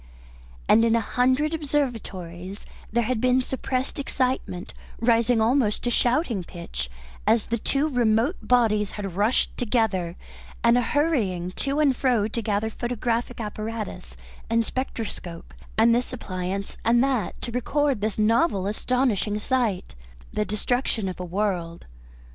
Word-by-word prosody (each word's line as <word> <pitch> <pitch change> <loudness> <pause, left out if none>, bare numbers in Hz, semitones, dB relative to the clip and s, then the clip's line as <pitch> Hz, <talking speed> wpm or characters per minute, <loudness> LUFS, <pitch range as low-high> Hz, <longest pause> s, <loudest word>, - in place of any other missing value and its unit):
And 225 - +6
in 230 0 +4
a - - +4
hundred 255 +7 +1
observatories 205 - -3 0.3
there 235 +2 +2
had 230 0 -1
been 255 0 +4
suppressed 260 +1 -2
excitement, 255 -9 -2 0.3
rising 230 0 +3
almost 225 -1 +2
to 240 - 0
shouting 240 - +1
pitch, 170 - -6 0.4
as 220 0 +4
the 235 0 -1
two 280 +6 +1
remote 245 - +2
bodies 215 -5 +2
had 195 -4 -5
rushed 210 +6 +2
together, 210 -8 0 0.5
and 235 0 +5
a 245 - +4
hurrying 225 - 0
to 275 +9 -2
and 285 -4 +4
fro, 245 -6 +2
to 230 +1 -3
gather 215 0 -1
photographic 240 0 -2
apparatus 215 -3 -5 0.3
and 230 0 +2
spectroscope, 220 -10 -5 0.2
and 230 +1 +6
this 240 +1 0
appliance 195 -4 -4
and 235 +2 +4
that, 255 -8 -1
to 235 - -3
record 270 0 0
this 215 -1 -1
novel, 215 - +3
astonishing 215 -1 0
sight, 220 -4 0 0.4
the 210 - 0
destruction 215 0 -1
of 185 - -7
a - - -3
world. 175 -3 -2
230 Hz, 135 wpm, -25 LUFS, 205-250 Hz, 0.5 s, And